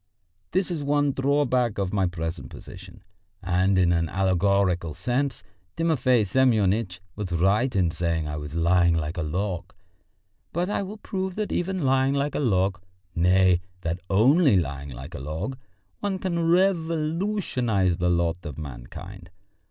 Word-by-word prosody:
This 190 Hz, 0 st, 0 dB
is 170 Hz, -, -2 dB
the 145 Hz, -, -5 dB
one 145 Hz, 0 st, +2 dB
drawback 135 Hz, -4 st, +1 dB
of 95 Hz, -1 st, -2 dB
my 95 Hz, -3 st, +2 dB
present 85 Hz, 0 st, -5 dB
position, -, -, -12 dB, 0.4 s
and 95 Hz, +1 st, +2 dB
in 90 Hz, -2 st, +4 dB
an 85 Hz, -1 st, 0 dB
allegorical 95 Hz, -3 st, +1 dB
sense 130 Hz, +1 st, -1 dB, 0.3 s
Timofey 130 Hz, -8 st, +2 dB
Semyonitch 105 Hz, -5 st, +2 dB, 0.2 s
was 100 Hz, -3 st, -5 dB
right 100 Hz, +9 st, +2 dB
in 90 Hz, -4 st, +2 dB
saying 85 Hz, -2 st, -1 dB
I 75 Hz, 0 st, -4 dB
was 75 Hz, +1 st, -7 dB
lying 85 Hz, 0 st, +3 dB
like 80 Hz, +2 st, -2 dB
a -, -, -1 dB
log. 90 Hz, +3 st, -3 dB, 0.8 s
But 180 Hz, +4 st, -1 dB
I -, -, 0 dB
will 200 Hz, +2 st, -6 dB
prove 190 Hz, -2 st, -4 dB
that 215 Hz, -1 st, -3 dB
even 185 Hz, -1 st, -1 dB
lying 135 Hz, +1 st, +2 dB
like 140 Hz, +1 st, 0 dB
a -, -, -1 dB
log 95 Hz, -, +1 dB, 0.3 s
nay, 90 Hz, +1 st, +4 dB, 0.2 s
that 85 Hz, 0 st, -2 dB
only 130 Hz, -, +5 dB
lying 70 Hz, -4 st, -3 dB
like 65 Hz, +1 st, -9 dB
a -, -, -6 dB
log 75 Hz, -, -4 dB, 0.4 s
one 200 Hz, -2 st, -2 dB
can 170 Hz, -3 st, -1 dB
revolutionise 165 Hz, -, +1 dB
the 90 Hz, 0 st, +1 dB
lot 85 Hz, -1 st, +1 dB
of 75 Hz, -4 st, -7 dB
mankind. 80 Hz, +7 st, -9 dB
100 Hz, 150 wpm, -25 LUFS, 85-145 Hz, 0.8 s, only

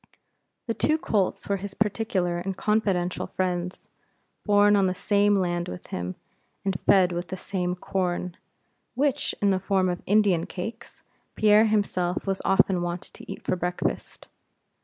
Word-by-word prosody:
The 230 Hz, -, -1 dB
two 310 Hz, +6 st, +1 dB
colts 205 Hz, -10 st, -1 dB
were 200 Hz, -, 0 dB
his 195 Hz, +1 st, -7 dB
particular 200 Hz, -5 st, 0 dB
and 190 Hz, +1 st, -4 dB
confidential 195 Hz, -5 st, 0 dB
friends; 180 Hz, -1 st, -3 dB, 0.6 s
born 205 Hz, 0 st, +5 dB
on 195 Hz, -2 st, +3 dB
the 185 Hz, -, -1 dB
same 205 Hz, +2 st, +2 dB
land 175 Hz, -2 st, 0 dB
with 90 Hz, -, -7 dB
him, 90 Hz, +1 st, -3 dB, 0.5 s
and 195 Hz, -1 st, 0 dB
fed 185 Hz, -2 st, +5 dB
with 175 Hz, 0 st, -3 dB
the 190 Hz, -, -5 dB
same 180 Hz, -1 st, -2 dB
corn, 180 Hz, -1 st, -2 dB, 0.6 s
which, 275 Hz, +1 st, 0 dB
in 200 Hz, -, +4 dB
the 190 Hz, -, +1 dB
form 190 Hz, -1 st, +1 dB
of 175 Hz, 0 st, -3 dB
Indian 200 Hz, -5 st, +3 dB
cakes, 220 Hz, +5 st, -7 dB, 0.3 s
Pierre 215 Hz, +1 st, +5 dB
himself 190 Hz, -4 st, 0 dB
was 195 Hz, -1 st, -1 dB
often 195 Hz, -1 st, +3 dB
wont 175 Hz, +1 st, -3 dB
to -, -, -10 dB
eat -, -, -8 dB
for -, -, 0 dB
breakfast. 180 Hz, 0 st, -3 dB
190 Hz, 155 wpm, -26 LUFS, 180-205 Hz, 0.6 s, born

